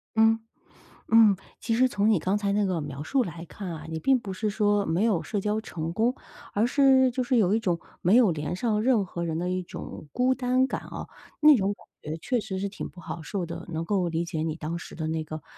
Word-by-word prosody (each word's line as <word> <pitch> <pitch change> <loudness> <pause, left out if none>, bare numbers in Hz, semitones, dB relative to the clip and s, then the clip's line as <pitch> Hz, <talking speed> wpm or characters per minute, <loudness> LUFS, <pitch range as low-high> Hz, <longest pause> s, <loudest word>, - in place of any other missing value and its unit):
嗯。 225 0 +5 0.7
嗯， 220 -3 +7 0.2
其 225 +1 -1
实 255 +2 +4
从 210 -2 +2
你 210 - +4
刚 190 +5 0
才 200 -1 0
那 205 0 +2
个 180 -4 -1
描 145 0 -6
述 260 - +1
来 170 -2 -7
看 195 +1 -7
啊， 155 -2 -7
你 160 0 -3
并 265 +9 +3
不 200 - -7
是 215 +2 -1
说 205 -1 +2
没 170 +6 +1
有 200 -8 +2
社 200 +6 -2
交 210 +2 0
成 165 -7 -4
功， 235 +5 +2 0.4
而 210 +3 +2
是 265 0 +5
就 255 +1 -1
是 250 0 +2
有 200 -2 +3
一 225 - +2
种 175 -6 0 0.2
没 185 +5 +4
有 240 -7 +6
连 150 +1 -3
上 210 +2 0
任 225 -5 +3
何 170 -1 -4
人 160 -1 -2
的 175 +1 -2
一 185 0 -1
种 165 - -8
孤 255 +1 +2
单 255 +1 +2
感 - - -4
哦， - - -6 0.3
那 300 -2 +8
种 195 -1 +1
感 - - -20 0.3
觉 160 - -4
确 250 +8 -1
实 190 -3 -5
是 200 +1 -2
挺 195 - -7
不 180 - -13
好 165 0 -6
受 175 +2 -3
的。 170 +1 -7
能 160 +1 -3
够 185 -4 +1
理 165 +1 -1
解 165 -2 -3
你 160 -1 -1
当 160 +1 -4
时 170 - -9
的 160 -1 -4
那 160 0 -2
个 155 0 -7
200 Hz, 265 characters per minute, -27 LUFS, 170-225 Hz, 0.7 s, 那